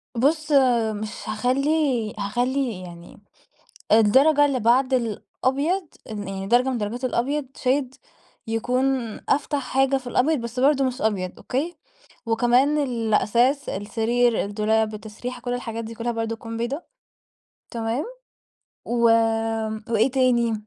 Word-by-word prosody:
بص 300 +5 +1 0.5
مش 215 - -6
هاخلي 250 +7 0 0.5
هاخلي 245 0 -1
يعني 170 -1 -12 0.7
درجة 270 +8 +5
اللي 270 -3 0
بعد 255 +4 +3
الأبيض 270 - -1 0.2
ال 205 -3 -5
يعني 195 0 -5
درجة 245 +3 +3
من 250 - -1
درجات 230 +4 -3
الأبيض 270 +4 -1
shade 260 0 0 0.5
يكون 250 +4 0 0.4
أفتح 290 0 +1
حاجة 270 +1 +2
في 255 -2 -9
الأبيض 280 +4 +2
بس 235 +2 -5
برضه 275 0 +3
مش 255 -1 -3
أبيض، 190 -4 -1
أوكي؟ 315 +7 -3 0.5
وكمان 245 +6 +3
الأساس، 240 +1 +1
السرير، 230 +3 0
الدولاب، 215 +1 0
التسريحة، 225 +4 -7
كل 245 0 -3
الحاجات 230 -2 -4
دي 225 +1 -7
كلها 235 +1 -3
برضه 225 0 -3
تكون 225 0 -7
بيضا 260 +8 -3 0.9
تمام؟ 230 +4 -2 0.8
و 235 0 -1 0.9
وإيه 230 +3 +2
تاني 245 -3 +2
245 Hz, 120 wpm, -23 LUFS, 225-270 Hz, 0.9 s, درجة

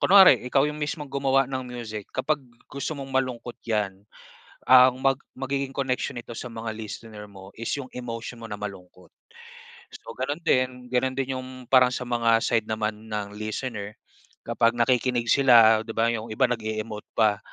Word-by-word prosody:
kunware 190 -9 +8
ikaw 135 +3 +2
'yong 150 0 -3
mismong 150 -1 -4
gumawa 135 -1 +2
ng 130 0 -4
music, 110 -4 -7
kapag 145 +3 0 0.2
gusto 140 +2 -5
mong 135 -1 -7
malungkot 125 -2 -2
'yan, 105 -4 -2 0.6
ang 125 0 +7
mag 135 -1 +3 0.2
magiging 135 0 -3
connection 130 -2 -1
nito 120 0 -8
sa 115 +2 -6
mga 115 -1 -5
listener 110 -1 -8
mo 95 -1 -13
is 115 - -4
'yong 135 -3 -7
emotion 120 -1 -6
mo 115 - -8
na 105 - -5
malungkot. 95 -3 -9 0.8
So 115 - -11
gano'n 145 +4 -3
din. 125 -2 +1
Gano'n 130 +1 0
din 135 0 -1
'yong 130 -1 -8
parang 125 0 +5
sa 125 0 -4
mga 115 -1 +3
side 115 -1 0
naman 110 0 -3
ng 105 -1 -4
listener 110 0 -5 0.4
kapag 115 0 +1
nakikinig 120 0 +1
sila, 115 -5 +6
'di 110 - -6
ba? 115 +1 +2
'Yong 115 -1 -3
iba 130 +1 +2
nag-e-emote 110 -2 -4
pa, 105 -2 +3
120 Hz, 170 wpm, -25 LUFS, 110-130 Hz, 0.8 s, kunware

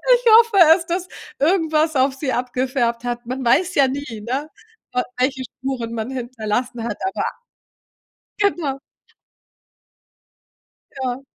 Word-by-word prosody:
Ich 485 - -4
hoffe 460 -3 +2 0.2
es, 335 - -7
dass 350 +2 -2 0.3
irgendwas 315 -1 +2
auf 265 +1 +3
sie 270 -1 -2
abgefärbt 250 -1 -1
hat. 240 0 -4
Man 255 +2 -4
weiß 350 +9 +3
ja 275 -1 +5
nie, 260 -5 -5
ne? 275 +5 -2 0.4
W 250 - +2 0.2
welche 260 +1 0
Spuren 250 -2 -5
man 225 +1 -3
hinterlassen 240 -1 -3
hat, 235 - -3
aber - - -2 1.1
genau. 350 -10 0 2.2
Ja. 260 -1 -3
260 Hz, 120 wpm, -21 LUFS, 245-305 Hz, 2.2 s, ja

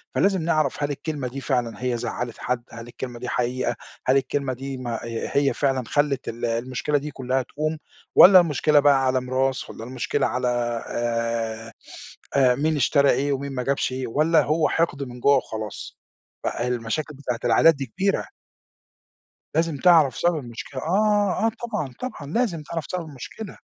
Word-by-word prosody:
فلازم 195 -2 +2
نعرَف 155 -3 0
هل 145 - 0
الكلمة 145 -2 -4
دي 135 +2 -6
فعلًا 120 -1 -2
هي 125 -1 0
زعّلِت 120 0 -4
حد، 125 -1 -2
هل 115 0 -9
الكلمة 120 0 -7
دي 125 - -5
حقيقة، 125 +1 -1 0.3
هل 130 +2 +5
الكلمة 135 -1 -1
دي 135 +1 -6
ما 120 -2 -4
آآ 115 0 -4
هي 140 -1 +3
فعلًا 135 -2 0
خلّت 145 -2 0
ال 120 +1 -4
المشكلة 125 +5 -1
دي 150 +1 -5
كلّها 130 0 -1
تقوم 155 +4 -3 0.4
والَّا 185 +1 +10
المشكلة 150 -2 +3
بقى 140 -2 +4
على 130 0 +2
ميراث 130 +1 -1
والَّا - - -8
المشكلة 125 +1 -1
على 125 +2 -1 0.4
آآ، 115 -1 -2 0.6
آآ 130 -3 +5
مين 155 +4 +1
اشترى 140 0 +3
إيه 140 +1 +1
ومين 140 0 -4
ما 125 - -2
جابش 135 0 0
إيه 130 0 -3
والَّا 155 +7 +3
هو 155 +1 +1
حِقد 160 -4 0
من 125 -2 -9
جوّه 140 +3 +5
وخلاص 110 -4 -6 0.5
ف - - -1
آآ 120 - -2
المشاكل 125 +5 -2
بتاعة 125 -4 -4
العائلات 165 -1 +5
دي 135 -1 -4
كبيرة. 195 - -1 1.3
لازم 165 -2 +1
تعرَف 160 -4 +5
سبب 175 -1 +2
المشكلة، 130 0 -7
آه، 205 +3 +2
آه - - +4
طبعًا، 210 - -5
طبعًا 150 - -6
لازم 205 -10 0
تعرَف 165 0 -5
سبب 180 -2 -3
المشكلة. 155 - -9
135 Hz, 170 wpm, -24 LUFS, 125-155 Hz, 1.3 s, والَّا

